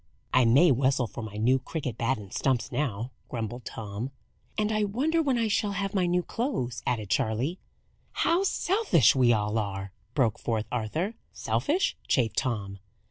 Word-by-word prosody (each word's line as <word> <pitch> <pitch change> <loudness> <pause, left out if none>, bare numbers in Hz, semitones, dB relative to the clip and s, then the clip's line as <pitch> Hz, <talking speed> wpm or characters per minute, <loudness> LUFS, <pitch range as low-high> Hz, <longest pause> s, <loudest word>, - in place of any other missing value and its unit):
"I 130 -1 +5
may 140 +9 +6
whistle 130 0 +2
for 120 - -7
my 110 -2 -7
new 125 +5 +3
cricket 130 -2 -4
bat 130 +3 0
and 100 -2 -10
stumps 130 -1 0
now," 125 -3 -2 0.2
grumbled 120 0 -4
Tom. 105 +3 -5 0.5
"And 215 0 +1
I 215 -1 +1
wonder 280 +11 +1
when 275 -5 +1
I 230 -1 +1
shall 205 0 +1
have 195 0 -2
my 185 -3 +2
new 180 0 +1
clothes?" 150 - -2
added 110 -5 -1
Charley. 115 - 0 0.5
"How 335 +3 +2
selfish 385 - +3
we 125 -2 +5
all 105 0 +1
are!" 95 -2 -4 0.2
broke 120 -7 +2
forth 110 -2 -1
Arthur. 140 - -1 0.2
"Selfish?" 345 +7 0
chafed 115 -5 +1
Tom. 100 -6 -2
130 Hz, 165 wpm, -28 LUFS, -, 0.5 s, may